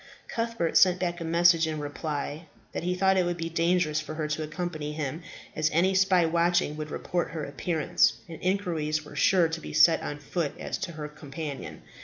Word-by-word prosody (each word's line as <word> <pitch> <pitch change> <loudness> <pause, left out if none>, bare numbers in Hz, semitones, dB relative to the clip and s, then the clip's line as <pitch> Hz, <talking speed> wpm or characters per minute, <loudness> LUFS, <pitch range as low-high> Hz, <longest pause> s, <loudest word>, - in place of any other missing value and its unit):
Cuthbert 230 -7 -1
sent 185 -1 +5
back 175 -1 -2
a - - -2
message 170 0 +4
in 155 -1 -3
reply, 150 +1 -4 0.2
that - - -4
he 180 +2 -1
thought 190 +1 +3
it 185 - +4
would 175 0 -1
be 165 0 -3
dangerous 165 -2 +1
for 155 0 -7
her 155 -1 -2
to 155 +1 -2
accompany 155 -1 -4
him, 155 +1 -4 0.3
as 155 0 +2
any 180 +4 +3
spy 190 -2 +4
watching 170 -1 +2
would 155 0 -5
report 175 +3 -2
her 155 -3 -3
appearance, 160 +2 +1
and 165 -2 -9
inquiries 165 -5 -1
were - - -11
sure 180 -3 +4
to 160 0 -5
be - - -8
set 165 -1 +6
on 145 - -4
foot 150 +1 -3
as - - -4
to 170 - -4
her 150 -1 -5
companion. 150 -1 -7
165 Hz, 200 wpm, -27 LUFS, 155-175 Hz, 0.3 s, set